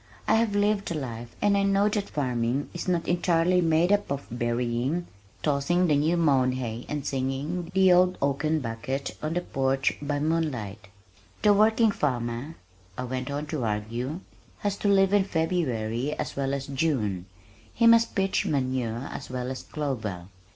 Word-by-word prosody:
I -, -, +4 dB
have 220 Hz, -2 st, +2 dB
lived 205 Hz, 0 st, +1 dB
the 170 Hz, -, -2 dB
life 120 Hz, -5 st, -6 dB
and 205 Hz, -1 st, +4 dB
I 200 Hz, -, +3 dB
know 200 Hz, +1 st, +3 dB
that 210 Hz, -1 st, -1 dB
farming 125 Hz, -1 st, -1 dB
is 175 Hz, -, -5 dB
not 175 Hz, -2 st, 0 dB
entirely 175 Hz, 0 st, +2 dB
made 165 Hz, +2 st, +3 dB
up 205 Hz, -7 st, +1 dB
of 140 Hz, 0 st, -3 dB
berrying, 120 Hz, +7 st, -1 dB, 0.4 s
tossing 155 Hz, +5 st, +2 dB
the 155 Hz, -4 st, +3 dB
new 155 Hz, +4 st, +2 dB
mown 135 Hz, -6 st, +3 dB
hay 120 Hz, -2 st, -5 dB
and 150 Hz, -2 st, -3 dB
singing 140 Hz, +6 st, -2 dB
The 190 Hz, -1 st, +6 dB
Old 180 Hz, +1 st, +4 dB
Oaken 150 Hz, +3 st, 0 dB
Bucket 120 Hz, +4 st, -4 dB
on 155 Hz, +2 st, -2 dB
the 175 Hz, -, +1 dB
porch 135 Hz, -3 st, 0 dB
by 145 Hz, 0 st, -1 dB
moonlight. 130 Hz, -11 st, -2 dB, 0.6 s
"The 210 Hz, -, +6 dB
working 220 Hz, +2 st, +4 dB
farmer," 125 Hz, -1 st, -2 dB, 0.4 s
I 125 Hz, -, -3 dB
went 130 Hz, +1 st, -4 dB
on 145 Hz, +1 st, -3 dB
to 145 Hz, -5 st, -1 dB
argue, 115 Hz, -, -3 dB, 0.4 s
"has 205 Hz, -1 st, 0 dB
to 205 Hz, -, -1 dB
live 195 Hz, -1 st, +4 dB
in 205 Hz, -1 st, +5 dB
February 150 Hz, -, -1 dB
as -, -, -4 dB
well 140 Hz, 0 st, -1 dB
as 135 Hz, -1 st, -4 dB
June. 130 Hz, -, -1 dB, 0.4 s
He 230 Hz, -, +1 dB
must 230 Hz, 0 st, +5 dB
pitch 195 Hz, -1 st, +1 dB
manure 130 Hz, -3 st, -1 dB
as -, -, -7 dB
well 125 Hz, 0 st, -3 dB
as 130 Hz, -, -5 dB
clover. 110 Hz, -, -4 dB
145 Hz, 170 wpm, -27 LUFS, 125-180 Hz, 0.6 s, The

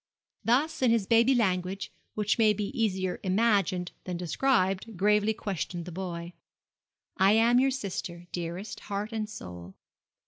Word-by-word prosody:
Thus 280 Hz, +8 st, +1 dB
in 255 Hz, -, +4 dB
his 230 Hz, -3 st, +2 dB
baby 230 Hz, +5 st, +4 dB
language, 190 Hz, -2 st, 0 dB, 0.2 s
which 210 Hz, +1 st, 0 dB
may 215 Hz, -2 st, +5 dB
be 210 Hz, 0 st, -3 dB
easier 190 Hz, -5 st, 0 dB
imagined 195 Hz, -3 st, +1 dB
than 180 Hz, -2 st, -3 dB
described, 190 Hz, -, 0 dB
gravely 210 Hz, +2 st, +3 dB
questioned 180 Hz, -5 st, -4 dB
the 180 Hz, -, -7 dB
boy. 170 Hz, -1 st, -5 dB, 0.8 s
'I 190 Hz, +1 st, +5 dB
am 230 Hz, +2 st, +5 dB
your 270 Hz, +1 st, +4 dB
sister, 190 Hz, -8 st, -4 dB
dearest, 175 Hz, +4 st, -5 dB
heart 205 Hz, +2 st, -3 dB
and 215 Hz, -1 st, -2 dB
soul. 90 Hz, -, -9 dB
200 Hz, 140 wpm, -28 LUFS, 180-225 Hz, 0.8 s, may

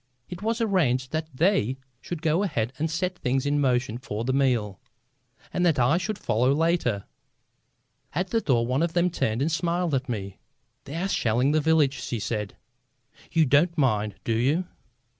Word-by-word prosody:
It 180 Hz, -1 st, -7 dB
was 225 Hz, +2 st, -1 dB
arranged 145 Hz, -, +1 dB
that 155 Hz, 0 st, -2 dB
they 130 Hz, -, +1 dB, 0.2 s
should 175 Hz, -2 st, -6 dB
go 160 Hz, +3 st, +2 dB
ahead 130 Hz, -, -1 dB
and 160 Hz, +2 st, 0 dB
set 180 Hz, +3 st, -2 dB
things 130 Hz, +2 st, 0 dB
in 145 Hz, 0 st, +1 dB
motion 125 Hz, -3 st, +1 dB
for 110 Hz, -4 st, -4 dB
the 130 Hz, -, 0 dB
meal, 120 Hz, -8 st, +1 dB, 0.7 s
and 180 Hz, -, 0 dB
that 165 Hz, -5 st, +3 dB
I 130 Hz, +7 st, +3 dB
should 210 Hz, +2 st, -3 dB
follow 125 Hz, -, +1 dB
later. 155 Hz, -, +1 dB, 1.1 s
At 180 Hz, +1 st, -1 dB
the 230 Hz, -, +2 dB
door 120 Hz, -, +2 dB
one 130 Hz, +4 st, 0 dB
of 170 Hz, -1 st, 0 dB
them 175 Hz, 0 st, +2 dB
turned 115 Hz, -5 st, 0 dB
and 160 Hz, -, 0 dB
smiled 170 Hz, 0 st, 0 dB
at 130 Hz, -1 st, -1 dB
me. 100 Hz, -5 st, -5 dB, 0.5 s
"They 140 Hz, -, -7 dB
are 180 Hz, +4 st, -1 dB
shelling 125 Hz, -, +1 dB
the 155 Hz, 0 st, +2 dB
village," 145 Hz, -4 st, +2 dB
she 120 Hz, -, -3 dB
said. 105 Hz, -1 st, -3 dB, 0.8 s
"You 160 Hz, -1 st, +4 dB
don't 155 Hz, +6 st, +3 dB
mind, 110 Hz, -7 st, +1 dB
do 115 Hz, -, 0 dB
you?" 140 Hz, +11 st, +1 dB
140 Hz, 180 wpm, -26 LUFS, 120-170 Hz, 1.1 s, You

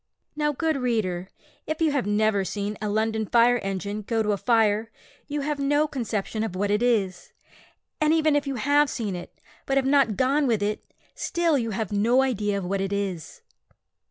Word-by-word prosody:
Now, 300 Hz, 0 st, +1 dB
good 315 Hz, +1 st, -1 dB
reader, 205 Hz, -8 st, -1 dB, 0.4 s
if 310 Hz, 0 st, -3 dB
you 320 Hz, -2 st, +2 dB
have 275 Hz, -7 st, -1 dB
never 205 Hz, -1 st, +2 dB
seen 205 Hz, +2 st, -3 dB
a 210 Hz, -, -2 dB
London 220 Hz, +1 st, 0 dB
fire 240 Hz, +2 st, +4 dB
engine 200 Hz, +1 st, -4 dB
go 225 Hz, +2 st, -1 dB
to 210 Hz, -, 0 dB
a 205 Hz, -, 0 dB
fire, 225 Hz, -1 st, +2 dB, 0.4 s
you 290 Hz, 0 st, -3 dB
have 290 Hz, 0 st, -2 dB
no 290 Hz, +2 st, +2 dB
conception 225 Hz, -5 st, -3 dB
of 220 Hz, -5 st, -4 dB
what 200 Hz, +2 st, 0 dB
it 210 Hz, +2 st, +1 dB
is; 195 Hz, -7 st, 0 dB, 0.7 s
and 305 Hz, 0 st, +3 dB
even 315 Hz, -2 st, +3 dB
if 290 Hz, 0 st, 0 dB
you 275 Hz, -, -2 dB
have 285 Hz, +4 st, +3 dB
seen 210 Hz, -6 st, -3 dB
it, 175 Hz, -, -10 dB, 0.3 s
but 270 Hz, -, +1 dB
have 270 Hz, -, +2 dB
not 270 Hz, -6 st, +3 dB
gone 275 Hz, +2 st, +2 dB
with 220 Hz, -4 st, +1 dB
it, 210 Hz, +1 st, -2 dB, 0.3 s
still 340 Hz, -3 st, 0 dB
you 235 Hz, -4 st, 0 dB
have 220 Hz, +1 st, -3 dB
no 230 Hz, +6 st, +3 dB
idea 210 Hz, -6 st, 0 dB
of 195 Hz, -, -4 dB
what 195 Hz, +2 st, -1 dB
it 195 Hz, 0 st, -2 dB
is. 195 Hz, -5 st, -4 dB
225 Hz, 195 wpm, -25 LUFS, 205-275 Hz, 0.7 s, fire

